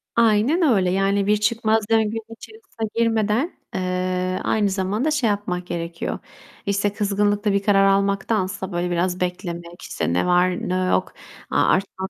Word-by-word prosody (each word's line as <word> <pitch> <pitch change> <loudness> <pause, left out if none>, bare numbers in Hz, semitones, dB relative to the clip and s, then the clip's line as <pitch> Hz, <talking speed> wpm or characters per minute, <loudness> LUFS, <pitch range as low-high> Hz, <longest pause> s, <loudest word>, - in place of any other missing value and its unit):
Aynen 235 - +3
öyle! 210 - +3
Yani 195 +1 +1
bir 210 0 +4
çıkmaz 220 0 +1
döngünün 225 0 0
içerisine 395 - -8
girmeden, 230 - +1 0.2
eee, 185 0 -1
aynı 210 -2 +1
zamanda 200 +9 -1
şey 280 -7 +1
yapmak 180 -3 -2
gerekiyor. 170 -1 -4 0.5
İşte, 200 0 0
kızgınlıkla 205 0 +1
bir 200 0 +1
karar 195 -1 +4
almaktansa, 195 -1 0
böyle, 175 0 -2
biraz 180 +1 0
beklemek, 175 -1 -4
işte, 85 - -3
ne 90 - +1
var 180 0 +1
ne - - 0 0.2
yok, - - 0 0.4
a - - +2
artmak 190 0 0
200 Hz, 145 wpm, -22 LUFS, 185-220 Hz, 0.5 s, bir